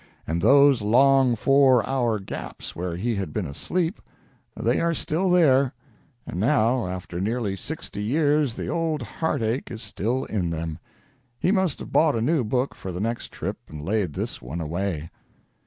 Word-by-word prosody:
And 85 +2 -1
those 140 +3 +6
long 130 +3 +4
four 130 -1 +4
hour 120 -5 +1
gaps 95 - -7
where 85 0 -3
he 115 +6 -1
had 95 - -3
been 105 -4 -2
asleep 165 - -2 0.6
they - - +1
are 170 0 +1
still 175 +6 0
there; 140 -7 +4 0.5
and 90 - -5
now, 120 -1 +2
after 90 -1 -5
nearly 105 0 -1
sixty 125 - -6
years, 145 +2 +2
the - - -4
old 160 -5 -1
heartache 120 -3 -2
is 115 -2 -7
still 125 +6 -2
in 95 -6 -1
them. 80 -1 -4 0.6
He 180 - +1
must 190 -6 +1
have - - -8
bought 155 -4 +4
a - - 0
new 145 +3 +2
book 125 +4 0
for 95 - -7
the 90 - -5
next 115 +3 -3
trip - - -4
and 75 - -9
laid 100 -5 0
this - - -4
one 65 +8 -6
away. 85 0 -3
120 Hz, 170 wpm, -25 LUFS, 95-140 Hz, 0.6 s, those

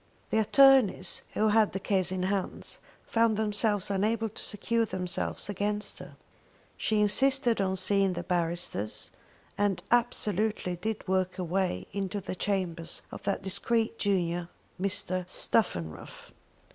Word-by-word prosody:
The - - +2
attornies 255 -5 +4
who 215 0 +3
had 215 0 +3
the 195 - -2
case 190 -2 +1
in 185 -1 -2
hands, 195 0 -2 0.3
found 225 -2 +2
themselves 210 -2 +1
unable 220 +3 0
to 210 - -6
secure 230 +3 0
themselves 180 -4 -2
against 205 +1 -1
her. - - -11 0.6
She 215 -1 0
insisted 240 +1 +3
on 190 -1 0
seeing 195 0 +3
the 175 0 -4
barristers, 170 - -1 0.5
and 205 -3 +1
absolutely 215 -5 +1
did 215 +4 -4
work 185 0 0
her 185 - -4
way 180 - -1
into 200 0 -3
the 190 - -5
chambers 180 -4 -2
of - - -8
that 195 - -1
discreet 225 +4 0
junior 175 -3 0 0.3
Mr. 185 -2 0
Stuffenruff. 85 - -1
200 Hz, 135 wpm, -29 LUFS, 185-215 Hz, 0.6 s, attornies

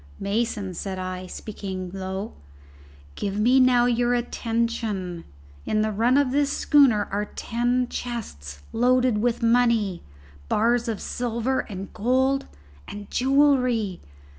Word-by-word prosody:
"Mason," 205 -1 -2
said 190 +2 -5
I, 185 0 -5
speaking 190 -3 -6
low, 190 +2 -5 0.8
"give 200 - -3
me 250 +5 +4
now 250 -2 +5
your 245 0 +2
attention. 225 -7 -2 0.4
In 215 - 0
the 215 - 0
run 235 +6 +2
of 285 -3 +2
this 285 +1 +1
schooner 260 -11 +4
are 205 +1 -1
ten 240 +3 -1
chests 75 - -6
loaded 250 -1 +3
with 240 +1 0
money, 230 -6 +2 0.5
bars 235 +2 +2
of 225 -3 -2
silver 245 +2 -2
and 195 -2 -6
gold, 260 +5 +1 0.4
and 205 0 -9
jewellery. 255 -7 +2
230 Hz, 120 wpm, -24 LUFS, 200-245 Hz, 0.8 s, now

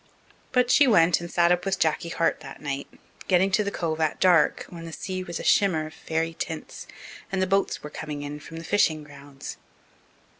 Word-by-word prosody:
But 250 -1 +3
she 285 - +6
went 170 -7 +5
and 170 - -6
sat 170 0 +3
up 175 0 +2
with 195 0 0
Jacky 160 0 0
Hart 165 0 0
that - - -10
night, 140 -1 -4 0.4
getting 190 +1 +3
to 210 +2 +3
the 200 - -1
Cove 165 -5 -2
at 155 - 0
dark, 175 -5 +4
when 170 -1 -9
the 165 - -7
sea 185 +3 -4
was 170 -2 -5
a - - -6
shimmer 180 -6 +3
of 155 - -9
fairy 165 +1 -2
tints 160 -1 -6 0.4
and 195 - -1
the 190 - +3
boats 195 +1 0
were 150 - -7
coming 150 -2 -6
in 145 +1 -6
from 165 +2 -10
the 165 - -7
fishing 160 -4 +2
grounds. 140 -1 -10
165 Hz, 210 wpm, -26 LUFS, 155-185 Hz, 0.4 s, she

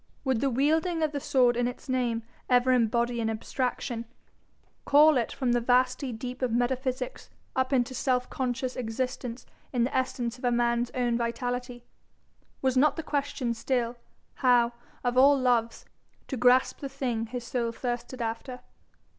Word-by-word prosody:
Would 260 -5 0
the 275 - +2
wielding 315 +6 +1
of 310 - +1
the 290 - -3
sword 255 -4 +3
in 245 0 +1
its 250 - -7
name 245 -3 0 0.3
ever 250 0 +4
embody 235 0 +2
an 225 - 0
abstraction, 235 +1 -3 0.8
call 300 +2 +6
it 240 -3 0
from 255 -3 -1
the 240 0 +2
vasty 255 +2 +2
deep 250 +3 -6
of 255 -2 0
metaphysics 255 - -2 0.3
up 260 0 0
into 260 -1 +1
self 250 0 0
conscious 255 0 -2
existence 250 +1 -4 0.3
in 245 -3 +1
the 255 - -2
essence 250 -2 -1
of - - -17
a 245 - +3
man's 240 0 +1
own 240 -2 +1
vitality? 245 +1 -3 0.8
Was 260 -1 +2
not 290 +4 +4
the 325 - -4
question 280 -5 -1
still, 240 0 -1 0.5
how, 245 -2 +4 0.3
of 245 0 +2
all 280 +2 +7
loves, 240 -3 +1 0.4
to 270 - -2
grasp 250 +1 +3
the 275 - -5
thing 245 -4 -2
his 245 +1 -5
soul 240 -2 -2
thirsted 240 +1 -4
after? 230 +3 -5
250 Hz, 160 wpm, -28 LUFS, 240-260 Hz, 0.8 s, all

